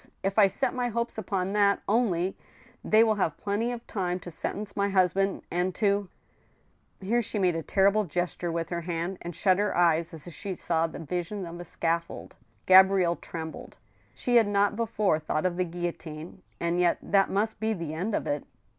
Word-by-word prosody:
If 195 +2 +1
I 200 - +8
set 250 +6 -1
my 250 -1 -1
hopes 235 0 -2
upon 190 -1 -2
that 200 -1 +3
only, 195 -5 +1 0.5
they 215 +1 +5
will 220 -2 +2
have 160 - 0
plenty 215 +4 -1
of 240 -1 -6
time 180 -3 -2
to 175 - -8
sentence 200 +5 -3
my 200 0 +1
hus 185 -3 +3
band, 195 0 0
and 180 +1 0
to—" 200 -3 +1 0.9
Here 225 +5 +1
she 220 - -3
made 180 -4 +2
a 165 - -2
terrible 200 +6 +2
gesture 175 0 -2
with 165 0 -3
her 170 -1 -2
hand, 175 +2 -3
and 175 -1 -6
shut 190 -2 +3
her 205 -3 0
eyes, 170 -1 +3
as 160 -2 -8
if 175 - -9
she 190 +3 -5
saw 165 -1 0
the - - -9
vision 180 +5 -4
of 170 0 -8
a - - -5
scaffold. 170 0 -3 0.3
Gabrielle 185 -2 +6
trembled. 160 -1 -8 0.4
She 245 -1 +2
had 225 -3 +5
not 205 0 +2
before 210 -7 +1
thought 155 +1 -2
of 180 -1 +1
the 185 - +1
guillotine, 170 -1 -6 0.2
and 170 +1 0
yet 175 -1 +3
that 195 -1 +3
must 210 +3 -1
be 220 +1 0
the 165 -6 -5
end 190 +7 -2
of - - -2
it. 145 0 -2
185 Hz, 200 wpm, -28 LUFS, 170-205 Hz, 0.9 s, I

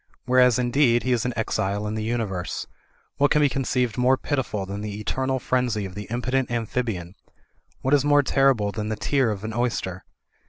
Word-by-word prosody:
Whereas, 125 -1 +5
indeed, 120 -1 +3
he 130 - 0
is 120 -2 +1
an 125 - -1
exile 105 -2 -1
in 105 - -3
the 110 - -3
universe. 110 -6 -2 0.5
What 145 0 +3
can 150 - +3
be 145 -1 +4
conceived 125 -3 -1
more 130 +1 +4
pitiful 125 -9 -2
than 100 +1 -5
the 105 -1 -5
eternal 130 +4 -1
frenzy 125 -5 0
of 95 - -8
the 105 0 -7
impotent 125 +2 -1
amphi 120 +1 -1
bian? 90 -7 -5 0.7
What 130 - +1
is 145 -2 +5
more 145 0 +4
terrible 130 -7 +2
than 105 0 -4
the 110 - -1
tear 130 +3 +1
of 105 -2 -4
an 110 - -3
oys 120 0 0
ter? 95 0 -6
120 Hz, 200 wpm, -24 LUFS, 105-130 Hz, 0.7 s, Whereas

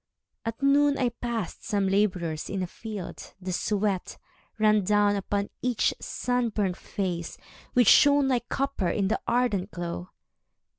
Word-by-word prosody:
At 225 +4 -4
noon 285 0 +4
I 250 -2 +2
passed 235 -4 -4
some 200 -3 0
labourers 180 -5 0
in 190 -1 -2
a - - 0
field. 205 +1 -8
The 185 0 -4
sweat 200 -1 -1 0.4
ran 215 -1 +4
down 205 +1 +3
upon 200 +1 -2
each 245 -3 +1
sunburnt 230 -7 -1
face, 175 -5 -4 0.4
Which 245 -3 +4
shone 285 +2 +6
like 245 -2 0
copper 275 -10 -1
in 195 -2 0
the 220 - 0
ardent 235 -6 +1
glow. 175 0 -5
210 Hz, 140 wpm, -27 LUFS, 190-245 Hz, 0.4 s, shone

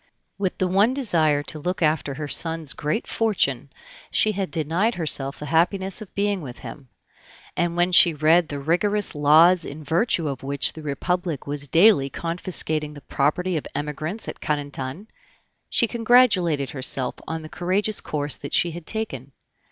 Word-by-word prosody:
With 190 -2 -1
the 185 - 0
one 200 +7 +3
desire 160 - +1
to 155 - -8
look 180 +3 -2
after 150 -3 0
her 150 +1 -5
son's 160 -1 -1
great 155 +10 -2
fortune, 145 - 0 0.4
she 215 - +2
had 195 -2 -3
denied 170 +8 0
herself 140 -4 -1
the 150 - -7
happiness 190 +6 0
of 210 - -11
being 200 -1 0
with 125 -5 -8
him; 135 -3 -10 0.7
and 170 -1 0
when 175 +1 +2
she 170 -2 +6
read 160 +3 +4
the 145 - -4
rigorous 185 +8 +1
laws 160 +4 +5
in 155 +1 -7
virtue 165 +2 +1
of 135 -3 -4
which 140 0 0
the 160 - -9
Republic 165 +1 -2
was 145 0 -3
daily 170 -4 +5
confiscating 160 -2 -3
the 145 - -11
property 170 +7 0
of 150 - -5
Emigrants 155 +8 -4
at - - -7
Carentan, 145 +3 -4 0.6
she 235 - +3
congratulated 215 - +3
herself 130 -1 -1
on 160 0 -4
the - - -8
courageous 190 +6 -1
course 145 -1 -3
that 140 - -8
she 170 - +3
had 170 0 -9
taken. 140 - -3
160 Hz, 165 wpm, -23 LUFS, 145-185 Hz, 0.7 s, she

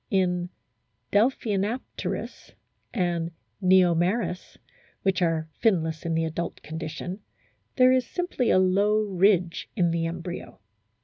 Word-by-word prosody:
* - - -49
In 180 -4 +1 0.6
Delphinapterus 215 0 -1 0.4
and 175 -5 -1 0.3
JVeomeris, 185 +2 +2 0.5
which 190 -1 +1
are 165 -2 +1 0.2
finless 165 -7 +1
in 165 - 0
the 165 0 +1
adult 165 +1 -4
condition, 160 +4 -5 0.6
there 255 0 +6
is 255 -1 +2
simply 355 -9 -1
a - - +5
low 200 +3 +3
ridge 185 -3 +2
in 175 -6 +2
the 165 0 0
embryo. 170 +1 -6
185 Hz, 115 wpm, -26 LUFS, 170-210 Hz, 0.6 s, there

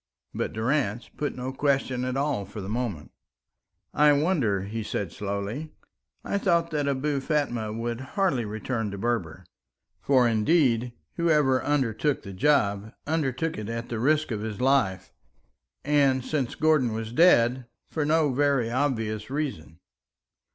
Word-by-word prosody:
But - - -2
Durrance 120 -1 -1
put 150 - -3
no 130 +1 -4
question 135 -2 0
at 130 +1 -2
all 140 -7 0
for 100 +3 -9
the 95 - -6
moment. 110 -8 -3 0.8
"I 150 0 +5
wondered," 135 - +1
he 115 +1 -3
said 100 -4 -3
slowly. 100 - -4 0.5
"I 200 - -1
thought 170 -4 +1
that 145 -2 -1
Abou 140 +1 0
Fatma 135 -7 -1
would 115 +2 -3 0.2
hardly 180 -12 +2
return 110 +1 -3
to 100 - -6
Berber. 95 -6 -2 0.6
For, 130 -3 +4
indeed, 120 +1 +2 0.3
whoever 150 -6 +3
undertook 145 0 0
the 100 - -8
job 100 -3 +1
undertook 155 -2 -1
it 105 0 -5
at 115 0 -4
the 115 - -3
risk 150 +3 +2
of 105 -2 -2
his 110 -2 -5
life, 115 -9 +1 0.7
and, 135 -3 +2
since 140 -6 -2
Gordon 150 -7 +2
was 110 +1 -5
dead, 125 -6 +4 0.2
for 155 - -1
no 150 -2 +2
very 135 -4 +1
obvious 115 -5 -1
reason." 130 - -4
125 Hz, 145 wpm, -26 LUFS, 110-145 Hz, 0.8 s, I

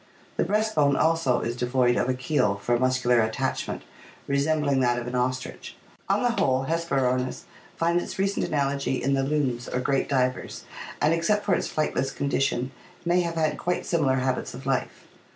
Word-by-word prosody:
The - - +1
breast 215 +1 0
bone 140 -2 +3
also 160 -7 +2
is 120 +1 -2
devoid 125 0 +2
of 125 - 0
a 130 - +1
keel 130 -6 +1
for 120 +4 0
muscular 125 -2 +3
attachment, 110 0 -2 0.4
resembling 140 0 +1
that 120 -1 +2
of 120 - -3
an 125 - -5
ostrich. 125 0 -3 0.3
On 200 +3 +2
the 245 - +3
whole, 135 - +1
Hesperornis 135 -6 0 0.3
finds 170 +1 +1
its - - -7
recent 195 +1 0
anal 140 -2 +1
ogy 140 -2 -1
in 140 +2 0
the 135 - +2
loons 135 -4 -1
or 125 - -1
great 135 +1 0
divers, 130 -2 -1 0.4
and 155 +2 +3
except 205 +6 +1
for 200 - +2
its - - -1
flightless 135 -3 0
condi 140 -1 -1
tion 130 -2 0 0.3
may 175 +1 +3
have 170 -1 -3
had 155 -2 0
quite 180 0 -1
similar 145 -6 +2
habits 130 -1 -1
of 130 +1 -10
life. 135 -2 -2
135 Hz, 185 wpm, -26 LUFS, 125-160 Hz, 0.4 s, bone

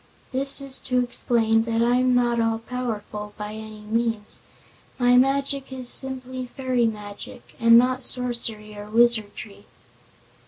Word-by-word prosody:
This 275 +2 -1
is 275 -1 -1
to 255 -1 -2
explain 225 -2 +1
that 230 0 0
I'm 250 +1 +2
not 240 -1 +1
all 225 0 +1
powerful, 220 -3 -6
by 210 0 -6
any 215 -1 -9
means. 225 0 -3 0.6
My 245 0 +3
magic 275 +1 +1
is 255 -2 +1
simply 260 -1 +2
fairy 250 -2 -1
magic, 205 -2 -9
and 230 0 +6
not 255 +2 +2
sorcery 235 -4 -1
or 205 0 -9
wizardry." 220 -3 0
235 Hz, 130 wpm, -23 LUFS, 220-255 Hz, 0.6 s, and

